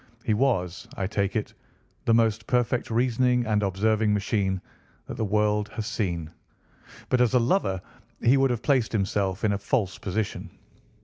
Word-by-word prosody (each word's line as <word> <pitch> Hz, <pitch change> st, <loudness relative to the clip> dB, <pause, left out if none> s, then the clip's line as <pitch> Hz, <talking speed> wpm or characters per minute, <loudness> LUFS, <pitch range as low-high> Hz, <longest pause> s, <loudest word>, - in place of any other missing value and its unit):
He 110 Hz, -, +1 dB
was, 105 Hz, -7 st, 0 dB
I 95 Hz, -, -1 dB
take 100 Hz, 0 st, -1 dB
it, 110 Hz, -, -2 dB, 0.5 s
the 115 Hz, -, +4 dB
most 115 Hz, -1 st, +1 dB
perfect 125 Hz, 0 st, +1 dB
reasoning 125 Hz, +1 st, +2 dB
and 105 Hz, -1 st, +1 dB
observing 105 Hz, +2 st, +1 dB
machine 100 Hz, -2 st, 0 dB, 0.5 s
that -, -, -7 dB
the -, -, -2 dB
world 105 Hz, 0 st, +1 dB
has 110 Hz, -, -3 dB
seen, 85 Hz, -8 st, -2 dB, 0.8 s
but 125 Hz, -, +3 dB
as 125 Hz, +1 st, +3 dB
a -, -, +6 dB
lover 115 Hz, -, +1 dB, 0.4 s
he 125 Hz, +3 st, +4 dB
would 135 Hz, 0 st, +3 dB
have 120 Hz, -2 st, -2 dB
placed 130 Hz, -5 st, +2 dB
himself 100 Hz, -1 st, -1 dB
in 110 Hz, -, +3 dB
a 100 Hz, -, -2 dB
false 100 Hz, -1 st, -1 dB
position. 105 Hz, +2 st, -3 dB
110 Hz, 165 wpm, -26 LUFS, 100-120 Hz, 0.8 s, a